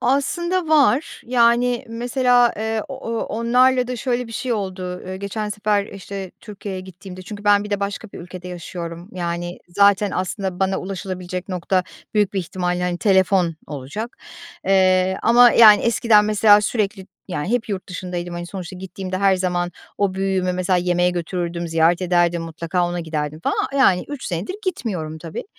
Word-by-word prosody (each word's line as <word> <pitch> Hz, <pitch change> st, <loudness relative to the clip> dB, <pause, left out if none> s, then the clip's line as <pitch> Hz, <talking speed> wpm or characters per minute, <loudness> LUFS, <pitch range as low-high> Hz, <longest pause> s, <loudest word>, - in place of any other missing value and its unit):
Aslında 345 Hz, +6 st, 0 dB
var. 295 Hz, -2 st, +3 dB
Yani 240 Hz, +1 st, +3 dB
mesela, 245 Hz, +1 st, +2 dB
eee, 220 Hz, 0 st, -2 dB
o 270 Hz, -, -6 dB
o 230 Hz, -, -1 dB
onlarla 250 Hz, +3 st, +2 dB
da 250 Hz, 0 st, -4 dB
şöyle 250 Hz, 0 st, -1 dB
bir 230 Hz, -, -10 dB
şey 250 Hz, +3 st, -2 dB
oldu. 185 Hz, -4 st, -4 dB
Eee, 185 Hz, 0 st, -5 dB
geçen 205 Hz, +2 st, -4 dB
sefer, 210 Hz, -1 st, 0 dB
işte, 195 Hz, -1 st, -7 dB
Türkiye'ye 200 Hz, -3 st, -7 dB
gittiğimde 185 Hz, 0 st, -11 dB
Çünkü 205 Hz, +2 st, -9 dB
ben 205 Hz, 0 st, +4 dB
bir 210 Hz, -, -8 dB
de 205 Hz, -1 st, -1 dB
başka 200 Hz, +2 st, -4 dB
bir -, -, -8 dB
ülkede 180 Hz, +1 st, -9 dB
yaşıyorum, 175 Hz, 0 st, -7 dB
yani 175 Hz, -1 st, -4 dB
zaten 200 Hz, +2 st, +3 dB
aslında 185 Hz, 0 st, -3 dB
bana 190 Hz, 0 st, +1 dB
ulaşılabilecek 185 Hz, -1 st, -5 dB
nokta 185 Hz, 0 st, 0 dB, 0.3 s
büyük 205 Hz, -2 st, +2 dB
bir 195 Hz, -, -1 dB
ihtimalle, 180 Hz, +1 st, -2 dB
hani, 175 Hz, -1 st, -1 dB
telefon 190 Hz, -4 st, +3 dB
olacak. 150 Hz, -, -6 dB, 0.5 s
Eee, 185 Hz, -1 st, +3 dB
ama 240 Hz, +1 st, +7 dB
yani 215 Hz, -3 st, +8 dB
eskiden 230 Hz, -2 st, +4 dB
mesela 210 Hz, 0 st, +5 dB
sürekli 200 Hz, -3 st, -2 dB, 0.2 s
Yani 175 Hz, +1 st, -3 dB
hep 240 Hz, -2 st, 0 dB
yurt 195 Hz, -2 st, -4 dB
dışındaydım, 180 Hz, -1 st, -5 dB
hani 175 Hz, 0 st, -5 dB
sonuçta 185 Hz, -1 st, -7 dB
gittiğimde 185 Hz, 0 st, -5 dB
her 195 Hz, -1 st, +4 dB
zaman 175 Hz, -1 st, -1 dB, 0.3 s
o 200 Hz, -2 st, +1 dB
büyüğümü 190 Hz, -1 st, 0 dB
mesela 185 Hz, +1 st, +1 dB
yemeğe 180 Hz, 0 st, +2 dB
götürürdüm, 175 Hz, -1 st, -3 dB
ziyaret 165 Hz, +2 st, +2 dB
ederdim, 175 Hz, -1 st, +2 dB
mutlaka 170 Hz, +2 st, -2 dB
ona 175 Hz, 0 st, -3 dB
giderdim 155 Hz, -1 st, -4 dB
falan. 275 Hz, +9 st, -1 dB
Yani 185 Hz, -9 st, +4 dB
3 290 Hz, -2 st, -6 dB
senedir 180 Hz, -, -3 dB
gitmiyorum 180 Hz, -, -3 dB
tabii. 165 Hz, 0 st, -6 dB
190 Hz, 165 wpm, -21 LUFS, 180-220 Hz, 0.5 s, yani